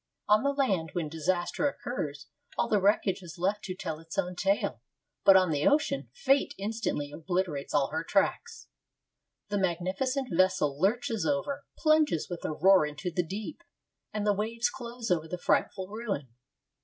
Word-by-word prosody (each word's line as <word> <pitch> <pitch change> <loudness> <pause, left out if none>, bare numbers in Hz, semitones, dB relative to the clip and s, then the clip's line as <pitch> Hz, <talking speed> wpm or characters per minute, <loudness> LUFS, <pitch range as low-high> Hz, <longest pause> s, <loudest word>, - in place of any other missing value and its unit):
On 210 +1 +5
the 280 - +1
land, 210 - +1
when 165 -4 -2
disaster 175 - 0
occurs, 150 - -4 0.3
all 120 0 +1
the 200 - +2
wreckage 195 -1 +2
is 175 -1 -10
left 200 +4 0
to 185 -1 -4
tell 165 -5 -5
its 165 0 -10
own 180 -2 -1
tale; 185 - 0 0.4
but 195 -1 +8
on 185 -3 +3
the 145 -1 +1
ocean 290 -1 +1
Fate 280 - +2
instantly 200 -8 -2
obliterates 165 -3 -2
all 135 - +2
her 160 +1 -2
tracks. 450 - 0 0.8
The 205 0 0
magnificent 190 - -1
vessel 185 -5 +2
lurches 225 +2 +1
over, 285 0 -1
plunges 310 - +2
with 175 - -5
a - - -1
roar 185 +4 +5
into 150 +4 -4
the 180 - +1
deep, 210 - -6 0.5
and 210 -1 -2
the 205 - +4
waves 230 +4 -1
close 240 -4 -6
over 160 -2 +1
the 180 - -4
frightful 185 +2 0
ruin. 200 - -4
190 Hz, 165 wpm, -29 LUFS, 165-230 Hz, 0.8 s, but